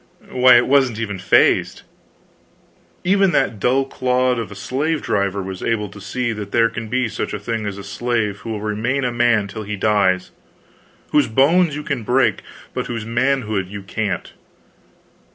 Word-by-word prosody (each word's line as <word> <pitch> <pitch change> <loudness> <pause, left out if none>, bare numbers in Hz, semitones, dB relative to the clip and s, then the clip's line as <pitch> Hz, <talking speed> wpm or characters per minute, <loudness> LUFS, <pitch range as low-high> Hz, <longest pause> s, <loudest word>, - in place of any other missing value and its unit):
why, 125 -1 +6
it 120 - +3
wasn't 130 -5 +3
even 105 -4 -4
phased. 90 - +2 1.2
Even 195 0 +3
that 110 - +1
dull 130 +5 +2
clod 125 -1 0
of 115 -2 -5
a - - -8
slave 145 +10 -1
driver 100 -3 -1
was 95 -1 -7
able 105 -3 -1
to 100 +1 -12
see 120 +3 -2
that 105 -2 -7
there 115 -1 +3
can 115 -2 -5
be 125 +1 0
such - - -4
a - - -5
thing 110 +1 -3
as 100 -1 -5
a 100 - -8
slave 105 0 -2
who 110 - -8
will 110 -2 -4
remain 110 +6 -1
a 125 - 0
man 120 -4 +2
till 110 - -7
he 105 0 -4
dies; 100 -3 +1 0.8
whose 150 - +3
bones 150 +7 +3
you 150 - -5
can 140 -5 -2
break, 125 +4 +1 0.3
but - - -3
whose 115 -3 -4
manhood 115 -5 0
you 100 +1 -8
can't. 100 -2 -3
115 Hz, 175 wpm, -20 LUFS, 105-130 Hz, 1.2 s, why